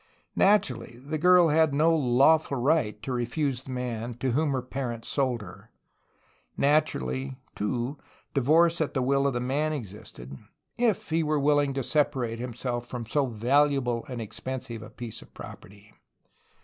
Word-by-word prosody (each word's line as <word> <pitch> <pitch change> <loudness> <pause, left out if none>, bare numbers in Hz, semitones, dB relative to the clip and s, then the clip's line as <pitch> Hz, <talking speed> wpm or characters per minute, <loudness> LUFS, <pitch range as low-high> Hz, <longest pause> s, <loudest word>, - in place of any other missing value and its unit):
Naturally, 130 - +2
the 155 +2 -3
girl 180 0 +6
had 155 -1 +3
no 165 +3 +4
lawful 140 +2 +3
right 120 -5 +1
to 135 - -4
refuse 125 +2 -1
the 135 - -14
man 120 -2 -4
to 130 +2 -1
whom 150 +5 +1
her 130 -2 -1
parents 125 -3 -5
sold 130 -5 0
her. 90 -2 -13 0.9
Naturally, 65 - +1 0.2
too, 120 +6 -3 0.3
divorce 165 +5 +3
at 155 - -2
the 130 - +1
will 140 +2 +2
of 140 - 0
the 120 - -1
man 145 +5 0
existed, 95 - -8 0.2
— - - -50
if 225 -9 +1
he 165 +1 +2
were 155 -1 +1
willing 145 -1 +2
to 135 - -1
separate 130 -6 0
himself 120 0 -4
from^so 125 +2 -1
valuable 125 +1 +2
and 125 -4 -5
expen 130 +4 -5
sive 115 -2 -8
a 110 - -10
piece 115 0 -7
of - - -18
property. 100 +2 -12
130 Hz, 160 wpm, -27 LUFS, 120-150 Hz, 0.9 s, girl